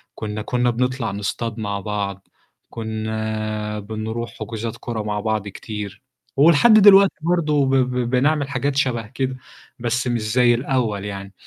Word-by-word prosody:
كنّا 105 Hz, 0 st, -4 dB
كنّا 125 Hz, +2 st, 0 dB
بنطلع 125 Hz, -1 st, -1 dB
نصطاد 105 Hz, +3 st, -3 dB
مع 100 Hz, -1 st, -2 dB
بعض، 100 Hz, -1 st, -4 dB, 0.4 s
كنّا 110 Hz, -1 st, -3 dB
بنروح 110 Hz, +3 st, -5 dB
حُجوزات 115 Hz, 0 st, -5 dB
كورة 110 Hz, -3 st, -4 dB
مع 105 Hz, -1 st, -2 dB
بعض 110 Hz, -1 st, -1 dB
كتير، 105 Hz, +2 st, -7 dB, 0.4 s
ولحد 165 Hz, +9 st, +6 dB
دلوقتي 200 Hz, -2 st, +8 dB
برضه 155 Hz, -4 st, +2 dB
ب 135 Hz, -, 0 dB, 0.4 s
بنعمل 140 Hz, +3 st, +1 dB
حاجات 140 Hz, 0 st, -1 dB
شَبه 120 Hz, -5 st, 0 dB
كده 130 Hz, +2 st, -3 dB, 0.4 s
بس 120 Hz, +2 st, -1 dB
مش 120 Hz, -2 st, 0 dB
زي 125 Hz, -1 st, +5 dB
الأول 115 Hz, -5 st, -1 dB
يعني. 100 Hz, -1 st, -7 dB
115 Hz, 135 wpm, -21 LUFS, 105-130 Hz, 0.4 s, دلوقتي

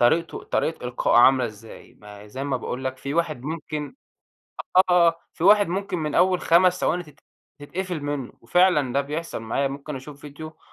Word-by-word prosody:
طريقته 160 Hz, +8 st, +2 dB
طريقة 160 Hz, -5 st, -2 dB
إلقائُه 120 Hz, -1 st, +1 dB
عاملة 130 Hz, 0 st, +6 dB
إزاي. 110 Hz, +1 st, -12 dB
ما 105 Hz, 0 st, -12 dB
زي 130 Hz, +6 st, -6 dB
ما 135 Hz, -2 st, -1 dB
باقول 125 Hz, +1 st, -5 dB
لك، 130 Hz, 0 st, -3 dB
في 140 Hz, +3 st, -5 dB
واحد 155 Hz, -6 st, -1 dB
ممكن 155 Hz, -, -5 dB, 1.0 s
آه، 170 Hz, -2 st, +5 dB, 0.2 s
في -, -, -6 dB
واحد 205 Hz, +1 st, +6 dB
ممكن 190 Hz, 0 st, -3 dB
من 150 Hz, -2 st, -3 dB
أول 185 Hz, -1 st, +3 dB
5 180 Hz, +2 st, +4 dB
ثواني 175 Hz, +2 st, 0 dB
تت 150 Hz, -3 st, -18 dB, 0.4 s
تتقفل 175 Hz, +2 st, -5 dB
منُّه، 145 Hz, -3 st, -4 dB
وفعلًا 150 Hz, -1 st, +3 dB
ده 140 Hz, -, +2 dB
بيحصل 155 Hz, +4 st, -5 dB
معايا. 135 Hz, +5 st, -1 dB
ممكن 140 Hz, +1 st, -7 dB
اشوف 140 Hz, +2 st, -10 dB
فيديو 155 Hz, +2 st, -10 dB
150 Hz, 175 wpm, -24 LUFS, 130-170 Hz, 1.0 s, عاملة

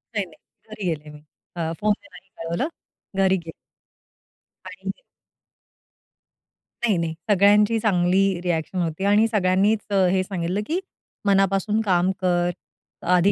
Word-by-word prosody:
नाही, 205 Hz, -2 st, 0 dB
नाही 165 Hz, -3 st, -18 dB, 0.3 s
घरी 215 Hz, -2 st, -6 dB
गेले 155 Hz, -3 st, -3 dB
मी, 150 Hz, 0 st, -12 dB, 0.4 s
अ, 165 Hz, -2 st, -2 dB
फोनने 215 Hz, +7 st, 0 dB
नाही 185 Hz, +2 st, -15 dB
कळवलं. 170 Hz, -, -2 dB, 0.5 s
घरी 190 Hz, -1 st, +4 dB
गेले. 165 Hz, -, -7 dB, 1.1 s
आणि -, -, -5 dB, 1.9 s
नाही, 210 Hz, -6 st, +2 dB
नाही 165 Hz, -1 st, -1 dB, 0.2 s
सगळ्यांची 205 Hz, +3 st, +5 dB
चांगली 190 Hz, -2 st, +2 dB
रिएक्शन 175 Hz, 0 st, -2 dB
होती 165 Hz, +2 st, -2 dB
आणि 205 Hz, +2 st, +4 dB
सगळ्यांनीच 205 Hz, 0 st, +2 dB, 0.3 s
हे 190 Hz, 0 st, +2 dB
सांगितलं 185 Hz, +1 st, -2 dB
की 340 Hz, +4 st, 0 dB, 0.5 s
मनापासून 195 Hz, +1 st, +2 dB
काम 185 Hz, -1 st, +3 dB
कर, 175 Hz, -1 st, +2 dB, 0.6 s
आधी 180 Hz, +2 st, +5 dB
190 Hz, 120 wpm, -23 LUFS, 175-205 Hz, 1.9 s, सगळ्यांची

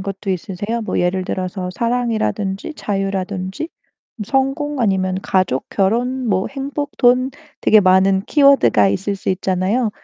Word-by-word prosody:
것도 195 Hz, 0 st, -4 dB
있으세요? 200 Hz, +5 st, -3 dB
뭐 -, -, -2 dB
예를 185 Hz, +1 st, 0 dB
들어서 185 Hz, 0 st, -3 dB
사랑이라든지 230 Hz, -1 st, -1 dB
자유라든지 195 Hz, -, -3 dB, 0.6 s
성공 270 Hz, +3 st, -1 dB
아니면 190 Hz, -3 st, +1 dB
가족, 185 Hz, -9 st, 0 dB
결혼 240 Hz, +5 st, 0 dB
뭐 190 Hz, -1 st, +1 dB
행복, 280 Hz, +1 st, -5 dB
돈 250 Hz, +1 st, +3 dB, 0.3 s
되게 215 Hz, -1 st, +5 dB
많은 190 Hz, +1 st, +4 dB
키워드가 275 Hz, -, +4 dB
있을 195 Hz, -, -2 dB
수 -, -, -6 dB
있잖아요. 190 Hz, +5 st, 0 dB
200 Hz, 305 characters per minute, -19 LUFS, 185-250 Hz, 0.6 s, 되게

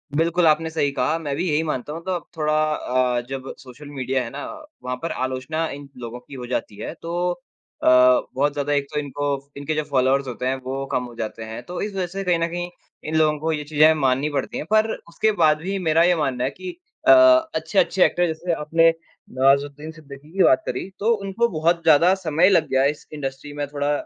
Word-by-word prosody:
बिल्कुल, 170 Hz, +2 st, +2 dB
आपने 160 Hz, +1 st, +2 dB
सही 155 Hz, -3 st, 0 dB
कहा, 155 Hz, +3 st, 0 dB
मैं 145 Hz, -4 st, -3 dB
भी 180 Hz, -, -2 dB
यही 150 Hz, +2 st, +1 dB
मानता 150 Hz, -1 st, -3 dB
हूँ। 165 Hz, +1 st, -7 dB
तो 190 Hz, -, -3 dB
अब 175 Hz, -, -6 dB
थोड़ा 155 Hz, 0 st, 0 dB, 0.2 s
अ, 125 Hz, -2 st, 0 dB
जब 135 Hz, 0 st, -5 dB
सोशल 140 Hz, +3 st, -12 dB
मीडिया 130 Hz, -2 st, -1 dB
है 115 Hz, -, -6 dB
ना, 145 Hz, +1 st, -6 dB, 0.4 s
वहाँ 125 Hz, 0 st, -3 dB
पर 165 Hz, -, -3 dB
आलोचना 130 Hz, +5 st, -2 dB
इन 140 Hz, 0 st, -8 dB
लोगों 120 Hz, 0 st, -7 dB
की 125 Hz, -, -16 dB
हो 125 Hz, -2 st, -6 dB
जाती 120 Hz, -4 st, -3 dB
है। 110 Hz, -, -5 dB
तो 175 Hz, +1 st, -1 dB, 0.5 s
अ, -, -, +2 dB, 0.5 s
बहुत 145 Hz, +2 st, +1 dB
ज़्यादा 145 Hz, 0 st, -1 dB
एक 140 Hz, -1 st, +1 dB
तो 150 Hz, -, 0 dB
इनको 140 Hz, -1 st, -3 dB
इनके 145 Hz, +2 st, -3 dB
जो 155 Hz, -, 0 dB
फॉलोवर्स 135 Hz, 0 st, +2 dB
होते 125 Hz, 0 st, -5 dB
हैं, 130 Hz, -, +1 dB
वो 135 Hz, +1 st, -4 dB
कम 125 Hz, -, 0 dB
हो 120 Hz, -1 st, -11 dB
जाते 110 Hz, 0 st, -5 dB
हैं, 110 Hz, +2 st, -7 dB
तो 175 Hz, +7 st, -6 dB
इस 205 Hz, -1 st, -3 dB
वजह 185 Hz, -2 st, -1 dB
से 195 Hz, +3 st, -5 dB
कहीं 180 Hz, -2 st, +1 dB
न 165 Hz, -, +1 dB
कहीं 175 Hz, +1 st, -4 dB, 0.4 s
इन 160 Hz, -, -2 dB
लोगों 155 Hz, -1 st, +3 dB
को 160 Hz, +2 st, -1 dB
ये 150 Hz, -1 st, -3 dB
चीज़ें 155 Hz, +1 st, +4 dB
माननी 135 Hz, 0 st, +1 dB
पड़ती 145 Hz, -, -3 dB
हैं। -, -, -4 dB
पर 220 Hz, 0 st, +3 dB, 0.2 s
उसके 215 Hz, +5 st, +1 dB
बाद 155 Hz, -1 st, +5 dB
भी 195 Hz, +3 st, -3 dB
मेरा 165 Hz, -1 st, +3 dB
ये 175 Hz, 0 st, +4 dB
मानना 135 Hz, -5 st, -1 dB
है 130 Hz, -, +1 dB
कि 360 Hz, -2 st, -8 dB, 0.3 s
अ, -, -, +9 dB, 0.4 s
अच्छे-अच्छे 190 Hz, -2 st, +1 dB
ऐक्टर, 175 Hz, -, +1 dB
जैसे 170 Hz, +2 st, -2 dB
आपने 165 Hz, +2 st, +3 dB, 0.4 s
नवाज़ुद्दीन 140 Hz, +3 st, +1 dB
सिद्दीकी 150 Hz, -1 st, -13 dB
की 190 Hz, -, +5 dB
बात 325 Hz, 0 st, +4 dB
करी, -, -, -4 dB
तो 220 Hz, +3 st, +2 dB
उनको 195 Hz, +5 st, +1 dB
बहुत 170 Hz, +1 st, +2 dB
ज़्यादा 165 Hz, +4 st, +5 dB
समय 165 Hz, +4 st, +3 dB
लग 190 Hz, -, +3 dB
गया 130 Hz, 0 st, +2 dB
इस -, -, -20 dB
इंडस्ट्री 140 Hz, 0 st, -6 dB
में 145 Hz, 0 st, -3 dB
थोड़ा 145 Hz, 0 st, -2 dB
150 Hz, 220 wpm, -22 LUFS, 135-165 Hz, 0.5 s, अ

